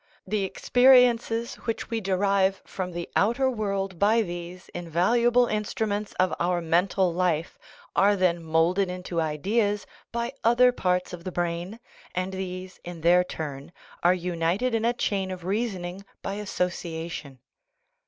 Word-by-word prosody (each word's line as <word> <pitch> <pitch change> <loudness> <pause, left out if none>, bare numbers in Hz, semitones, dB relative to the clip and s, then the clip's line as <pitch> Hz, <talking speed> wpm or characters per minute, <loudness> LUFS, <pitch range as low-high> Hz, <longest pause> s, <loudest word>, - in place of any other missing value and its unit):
The 205 +1 -1
experiences 245 0 +4
which 225 0 -3
we 225 -1 -1
derive 195 0 +1
from 185 -1 -5
the 170 0 -5
outer 250 +6 +2
world 195 -5 -2
by 220 +3 +4
these 175 0 -7
invaluable 230 +9 +2
instru 215 0 -2
ments 205 0 -3
of 185 -2 +1
our 175 0 +1
mental 175 +2 +2
life 170 -2 0 0.4
are 205 +1 +5
then 180 -3 +1
moulded 165 +4 +2
into 180 -2 -3
ideas 205 +7 0 0.3
by 235 +2 -2
other 245 +2 +5
parts 180 -6 -1
of 175 -1 -7
the 185 - -4
brain, 175 +5 -3 0.4
and 185 +1 -2
these, 185 0 -6
in 175 -2 -8
their 175 +2 +5
turn, 145 -4 -6 0.3
are 175 +1 +4
united 180 +7 -1
in 225 0 +1
a 240 - +3
chain 195 -5 -1
of 180 -2 -6
reasoning 195 -3 -2 0.2
by 195 - -3
association. 170 -7 -4
185 Hz, 145 wpm, -26 LUFS, 175-215 Hz, 0.4 s, are